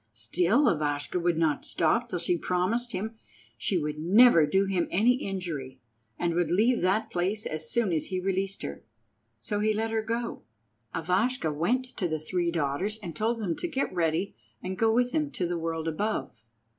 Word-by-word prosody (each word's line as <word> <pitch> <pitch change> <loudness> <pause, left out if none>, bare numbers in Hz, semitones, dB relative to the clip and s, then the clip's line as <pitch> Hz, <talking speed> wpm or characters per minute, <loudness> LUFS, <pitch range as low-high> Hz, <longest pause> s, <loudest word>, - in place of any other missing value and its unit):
Still 175 - +2
Ivashka 150 +2 0
would 175 -1 +1
not 160 -3 +1
stop 230 +10 +1
till 180 - -1
she 175 +1 0
promised 185 +8 0
him 220 +3 -4 0.4
she 190 - -1
would 150 -2 -2
never 180 -1 +6
do 190 +6 +2
him 190 -3 0
any 225 +7 +4
injury, 165 - -5 0.4
and 170 -1 0
would 170 -2 +1
leave 225 +8 +3
that 190 +5 +1
place 190 +5 -1
as 155 0 -4
soon 225 -7 +1
as 155 - 0
he 185 -1 -2
released 195 +1 -2
her. 70 - -6 0.6
So 205 - -2
he 215 +1 +2
let 225 +1 -1
her 225 0 +1
go. 230 +2 -3 0.5
Ivashka 180 +2 +1
went 230 - +1
to 185 - 0
the 155 -1 -2
three 170 +2 -1
daughters 170 +6 -1
and 170 -3 -6
told 230 +4 0
them 180 -7 -1
to - - -2
get 270 - -2
ready 170 +2 0 0.2
and 185 +1 -4
go 225 +3 +3
with 245 +2 +2
him 300 -2 0
to 180 - -1
the 175 0 -2
world 165 0 -3
above. 165 - -2
185 Hz, 185 wpm, -28 LUFS, 165-220 Hz, 0.6 s, never